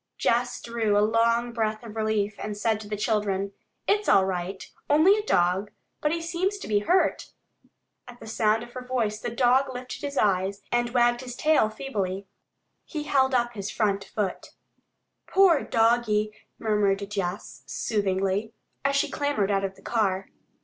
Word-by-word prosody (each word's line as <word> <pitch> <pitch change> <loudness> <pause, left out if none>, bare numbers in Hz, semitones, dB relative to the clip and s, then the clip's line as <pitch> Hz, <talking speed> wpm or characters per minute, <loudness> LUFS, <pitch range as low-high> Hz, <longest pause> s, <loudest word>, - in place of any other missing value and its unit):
Jess 245 +1 +1
drew 225 -3 0
a 205 - +4
long 230 +2 +2
breath 220 -1 -1
of 225 -2 -9
relief, 215 -1 0
and 210 -1 -4
said 215 0 +1
to 215 - -9
the 210 0 -3
children, 200 -2 0 0.4
"It's 415 +1 +2
all 190 - +6
right. 190 0 -4 0.2
Only 315 +7 +6
a 425 - -1
dog. 185 - +1 0.3
But 300 - +1
he 335 0 -2
seems 360 +4 -1
to - - -8
be 210 -1 +2
hurt." 355 - +1 0.8
At 245 0 -12
the - - -11
sound 220 0 +1
of 240 - -11
her 255 - -7
voice 235 -4 -1
the 240 - -3
dog 255 +3 +3
lifted 250 0 -7
his 280 -1 -4
eyes 195 0 +1
and 240 0 +1
wagged 240 0 +2
his 250 -1 -7
tail 300 -6 +3
feebly. 200 -5 -3 0.6
He 305 -3 -5
held 265 -3 +2
up 240 -1 +1
his 200 -2 -5
front 200 -3 0
foot. 195 -2 -4 0.7
"Poor 380 -6 +5
doggie," 225 -2 +2 0.2
murmured 205 -2 +1
Jess 195 -1 -4
soothingly, 200 0 -1 0.3
as 275 0 +1
she 280 - +2
clambered 285 -9 0
out 195 -1 +1
of 195 0 -3
the - - -19
car. 195 -4 0
220 Hz, 170 wpm, -26 LUFS, 205-250 Hz, 0.8 s, all